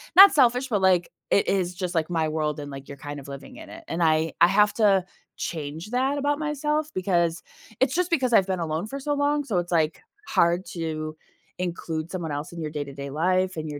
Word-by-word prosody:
not 390 +1 +11
selfish, 250 -2 +3
but 210 -6 0
like, 185 -2 +3 0.2
it 200 - +3
is 180 -2 0
just 180 -1 -3
like 165 -1 0
my 165 -2 0
world 155 -1 -2
and 145 -1 -7
like 135 0 -9
you're 140 - -9
kind 145 +1 -7
of 140 - -12
living 140 -1 -9
in - - -11
it, - - -11
and 165 - -3
I 160 0 +2
I 170 - +9
have 210 +2 +4
to 200 -5 +3 0.3
change 160 +5 -5
that 265 +3 +1
about 290 +1 0
myself 300 0 -1
because 175 -3 0 0.4
it's 260 0 +2
just 360 +2 0
because 260 -8 +1
I've 195 -4 +5
been 190 -1 -1
alone 165 +3 -2
for 275 +5 -6
so 290 +2 -1
long, 290 +1 +1
so 215 -10 0
it's 175 0 -5
like 160 -2 +1 0.3
hard 175 +2 +2
to 155 -2 -4 0.4
include 170 -2 -3
someone 175 -4 -4
else 145 +4 -4
in 170 - -7
your 155 -2 -4
day-to-day 140 -2 -6
life 185 +5 +1
and 155 0 -4
your 145 -1 -6
175 Hz, 220 wpm, -25 LUFS, 155-235 Hz, 0.4 s, not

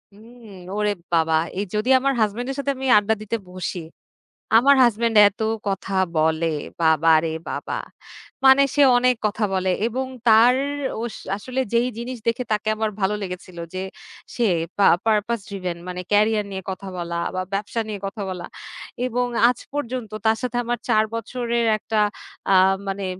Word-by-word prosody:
উম 230 0 -15 0.3
ওরে 210 0 +1 0.2
বাবা! 160 -1 +3 0.2
এই 205 - -1
যদি 215 +5 -1
আমার 275 +1 +1
হাসব্যান্ডের 240 +6 -1
সাথে 280 0 0
আমি 265 0 -3
আড্ডা 210 +1 +2
দিতে 220 +2 -2
বসি, 185 0 -5 0.8
আমার 280 +4 +6
হাসব্যান্ড 230 -1 +1
এত 205 +2 -5 0.3
কথা 195 0 -2 0.2
বলে, 160 +1 +2 0.4
বাবা 160 0 +4
রে 160 - -1 0.2
বাবা! - - -4 0.7
মানে 265 +1 +7
সে 290 - +4 0.2
অনেক 250 0 +3
কথা 210 +1 0
বলে। 185 0 +1 0.2
এবং 260 +3 -2 0.2
তার 230 +3 +6 0.5
ওস 235 - -5 0.2
আসলে 255 +5 -5
যেই 235 +2 +3
জিনিস 245 +2 -5
দেখে 230 +2 0
তাকে 215 0 -1
আমার 220 0 -1
ভালো 200 +2 +1
লেগেছিল 180 -2 -7 0.2
যে, 185 - -3 0.5
সে 240 - +1 0.3
পা 200 - +4 0.2
পারপাজ 220 +1 +1
ড্রিভেন। 185 -3 -4
মানে, 180 0 -5
ক্যারিয়ার 210 0 +3
নিয়ে 190 -1 -5
কথা 195 +1 -7
বলা, 170 -1 -4 0.2
বা 185 - -1
ব্যবসা 205 +3 -2
নিয়ে 205 -2 -5
কথা 205 +1 -7
বলা। 180 -2 -5 0.6
এবং 245 +1 -1 0.2
আজ 250 - -2
পর্যন্ত 250 -6 -4
তার 220 0 +3
সাথে 250 -1 -2
আমার 240 0 -2
৪ 215 -2 +4
বছরের 235 0 -2
একটা, 215 0 -2 0.5
আ - - +6 0.3
মানে, 195 0 -3
215 Hz, 160 wpm, -22 LUFS, 195-240 Hz, 0.8 s, মানে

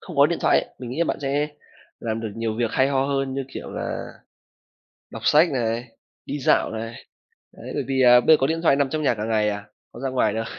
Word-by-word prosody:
không 175 -6 -10
có 140 +1 +7
điện 170 - -2
thoại - - +4
ấy, - - -13
mình 125 -2 -7
nghĩ 135 - -5
là 170 - +3
bạn - - -2
sẽ 145 +2 0 0.5
làm 115 -1 -3
được 110 -3 -5
nhiều 115 -1 -2
việc 115 -2 0
hay 130 +1 +2
ho 135 -1 +1
hơn, 135 -1 -1
như 135 -1 -2
kiểu - - -6
là - - -5 1.0
đọc - - -8
sách 155 +4 +5
này, 115 -2 -1 0.4
đi 145 - -3
dạo 130 - +2
này. 115 +1 -5 0.6
Đấy, - - -10
bởi 145 - -1
vì 135 - -2
là 125 -1 +8
bây 160 +5 +6
có 135 - +1
điện 165 +3 -1
thoại 140 -5 +4
nằm 140 -2 +1
trong 155 -1 -2
nhà 140 - +2
cả 105 -1 -4
ngày 110 -1 +1
à, 105 -1 -3 0.3
có 120 - -10
ra 135 - -2
ngoài 125 -5 +1
đâu. 115 0 -2
130 Hz, 250 wpm, -23 LUFS, 115-140 Hz, 1.0 s, là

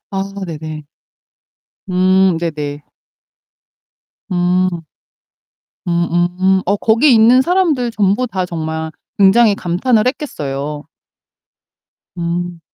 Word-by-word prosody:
아 195 0 -3 0.2
네네. 155 -2 -7 1.1
음 185 -1 +3
네네. 150 -3 -4 1.5
음. 180 -1 0 1.0
음음. 175 +2 +1
어 200 +3 +1
거기 230 +7 +3
있는 235 +3 +5
사람들 325 -8 +1
전부 210 +2 +1
다 190 -6 -3
정말 160 -2 -4 0.3
굉장히 205 +2 +5
감탄을 215 +6 0
했겠어요. 150 - -4 1.3
음. 175 0 -3
180 Hz, 155 characters per minute, -16 LUFS, 170-215 Hz, 1.5 s, 있는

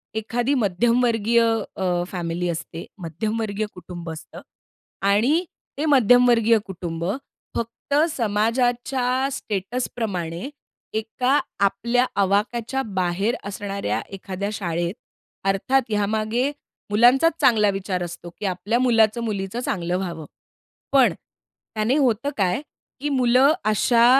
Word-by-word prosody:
एखादी 235 +4 0
मध्यमवर्गीय 235 +1 +2 0.3
अ, 180 -2 0
फॅमिली 175 -1 -2
असते, 165 0 -5
मध्यमवर्गीय 215 +5 -2
कुटुंब 175 -2 -8
असतं 160 0 -10 0.7
आणि 245 - +3 0.3
ते 295 - -1
मध्यमवर्गीय 245 -4 +5
कुटुंब 170 -3 -5 0.5
फक्त 235 +4 -4 0.2
समाजाच्या 245 +3 +1
स्टेटसप्रमाणे 200 -4 -3 0.5
एका 250 +5 +1 0.3
आपल्या 235 +6 +1 0.2
आवाक्याच्या 225 +6 0 0.2
बाहेर 185 +6 +1
असणाऱ्या 195 - -3
एखाद्या 195 +1 -4
शाळेत, 170 -3 -2 0.5
अर्थात 225 +8 +2
यामागे 215 +5 0 0.4
मुलांचाच 250 +9 +5
चांगला 215 -4 +5
विचार 190 -2 -2
असतो, 175 0 -7
की - - -4
आपल्या 195 +5 0
मुलाचं-मुलीचं 225 -3 +1
चांगलं 180 -7 -1
व्हावं. 170 -4 -4 0.7
पण 270 -3 +5
त्याने 220 +3 -5
होतं 255 -2 +2
काय, 190 +3 +1 0.4
की 295 +2 -2
मुलं 260 +1 +4
अशा 230 +2 +4
215 Hz, 100 wpm, -23 LUFS, 185-245 Hz, 0.7 s, मध्यमवर्गीय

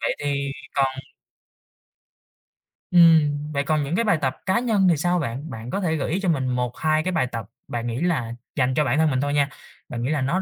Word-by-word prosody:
vậy - - -1
thì 140 -1 -1 0.2
còn 135 -1 +3 2.1
ừm, 160 -4 +6 0.2
vậy 140 -1 0
còn 155 0 +1
những 150 +5 -2
cái 230 - +2
bài 205 -6 +3
tập 130 -1 0
cá 190 +5 +2
nhân 215 -6 +2
thì 165 - +3
sao 175 +2 +1
bạn? 140 +2 -4
Bạn 115 +1 -7
có 195 - -2
thể 160 -4 0
gợi 145 0 -2
ý 185 - 0
cho 195 -2 0
mình 135 -5 +1
1-2 125 +6 0
cái 185 - -1
bài 160 -7 +1
tập 115 -3 -4 0.2
bạn 120 0 -3
nghĩ 120 +2 -3
là 140 -10 0 0.2
dành 130 -2 +1
cho 150 - +3
bản 130 +2 +1
thân 160 -1 +4
mình 130 0 0
thôi 145 0 -1
nha, 145 -1 +2 0.4
bạn 120 -1 -4
nghĩ 130 - -1
là 150 -3 0
nó 170 +9 0
145 Hz, 230 wpm, -23 LUFS, 130-170 Hz, 2.1 s, ừm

